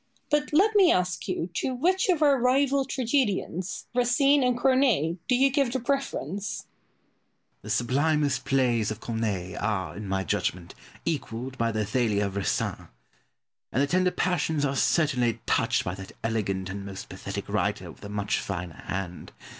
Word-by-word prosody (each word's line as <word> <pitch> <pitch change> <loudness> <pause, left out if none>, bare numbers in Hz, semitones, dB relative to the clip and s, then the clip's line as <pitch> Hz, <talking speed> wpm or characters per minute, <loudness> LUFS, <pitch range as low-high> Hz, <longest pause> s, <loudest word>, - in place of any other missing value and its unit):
But 295 0 +1
let 395 +8 +4
me 385 -4 +7
ask 180 -1 0
you 180 -2 -2
to 260 - -1
which 370 +9 +2
of 330 -4 +3
our 280 -3 +5
rival 270 +2 +3
tragedians, 230 - -1
Racine 275 +4 +4
and 250 -1 +2
Corneille, 245 - +3
do 250 - +3
you 270 +2 +4
give 275 -3 +2
the 260 - -1
preference? 225 - -2
Pope. - - -24 0.9
The 105 - -10
sublimest 140 +5 +1
plays 125 -5 +2
of 110 +1 -4
Corneille 105 -6 -3
are, 100 -3 -2
in 105 0 -6
my 95 0 -1
judgment, 90 +1 -2 0.3
equalled 130 -5 -3
by 115 0 +1
the 110 0 -1
Athalia 105 -1 +1
of 100 0 -4
Racine, 100 - -1 0.8
and 135 - +2
the - - +4
tender 185 +4 +2
passions 160 -5 0
are 140 -1 -1
certainly 130 -6 +2
touched - - +2
by 90 - -3
that 95 0 -9
elegant 100 -4 -1
and 100 0 -5
most 100 -1 -7
pathetic - - -6
writer - - -1
with - - -17
a 100 - -7
much 105 -1 -1
finer 90 -6 -5
hand. 90 -2 -4
145 Hz, 165 wpm, -27 LUFS, -, 0.9 s, me